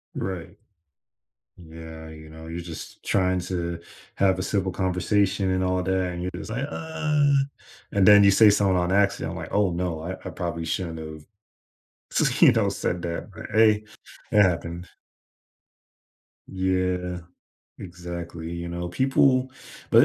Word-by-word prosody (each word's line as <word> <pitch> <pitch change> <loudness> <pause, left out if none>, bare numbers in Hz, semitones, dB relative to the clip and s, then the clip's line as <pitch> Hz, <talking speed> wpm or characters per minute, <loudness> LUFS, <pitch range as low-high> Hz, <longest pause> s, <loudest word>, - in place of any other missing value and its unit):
Right. 95 +1 -5 1.0
Yeah, 80 -1 -10
you 80 0 -12
know, 80 +1 -11
you're 85 +1 -5
just 85 -2 -9
trying 95 -1 +1
to 85 -1 -3 0.4
have 95 -1 +3
a - - -1
simple 95 -1 -1
conversation 95 +1 +1
and 95 0 +1
all 90 0 0
that, 95 -1 0
and 85 - -6
you're 90 - -2
just - - -7
like, 130 +5 -2
"Uh" 150 -3 0 0.6
And 100 -2 +3
then 105 -1 +9
you 100 - +7
say 105 +2 +7
something 100 -2 +3
on 90 +1 +1
accident, 100 0 +1
like, - - -6
"Oh, 100 -3 +2
no. 85 -2 -2
I 90 +3 -4
I - - -3
probably 85 -2 -4
shouldn't 85 -2 -3
have 80 -1 -8 0.9
s - - +1
you - - +8
know, - - +2
said 85 0 -2
that." 85 -1 -4
But, - - -8
hey, 110 -1 +4 0.5
it 105 - +6
happened. 85 -1 -1 1.6
Yeah, 90 -1 -1 0.6
exactly, 85 -2 -7
you 85 0 -5
know, 85 0 -4
people 130 +4 +2 0.4
but - - +7
90 Hz, 150 wpm, -25 LUFS, 85-100 Hz, 1.6 s, then